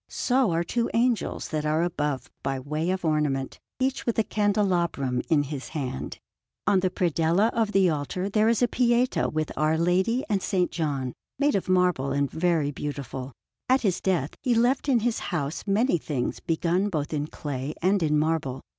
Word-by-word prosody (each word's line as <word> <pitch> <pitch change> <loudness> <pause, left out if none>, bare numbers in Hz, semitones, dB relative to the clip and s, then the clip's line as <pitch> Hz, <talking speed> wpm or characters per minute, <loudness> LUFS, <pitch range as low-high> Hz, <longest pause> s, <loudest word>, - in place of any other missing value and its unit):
So 255 -3 +1
are 170 0 +1
two 235 +7 -1
angels 235 -3 0
that 155 -2 -2
are 155 +2 +1
above 150 -5 -2
by 135 0 -2
way 150 +5 -2
of 185 -1 -1
ornament, 150 -4 0 0.2
each 260 0 0
with 235 - -1
a 225 - +4
candelabrum 180 -12 0
in 155 -4 +4
his 140 -1 -6
hand. 135 -4 -4 0.5
On 195 - +4
the 185 0 +1
predella 175 +4 +2
of 225 -2 +1
the 195 -2 +4
altar 155 +6 -2
there 215 +2 +3
is 230 +1 +2
a - - +5
Pietà 245 +1 +2
with 155 -1 -2
Our 155 +1 +2
Lady 185 +9 +1
and 200 -3 0
S. - - -3 0.2
John, 140 -6 -2 0.2
made 290 +1 +2
of 190 - -1
marble 180 -7 +2
and 140 -1 0
very 160 -4 +1
beautiful. 135 -2 -5 0.4
At 260 +1 +4
his 195 -6 0
death 170 -7 0
he 250 -3 +1
left 250 +5 +2
in 245 -4 +4
his 235 0 0
house 160 0 -3
many 205 -1 +2
things 140 -5 -3
begun 175 +3 0
both 155 -4 -3
in 145 0 -1
clay 145 -2 -5
and 190 +2 +2
in 150 -2 +2
marble. 150 -4 0
170 Hz, 180 wpm, -26 LUFS, 145-210 Hz, 0.5 s, a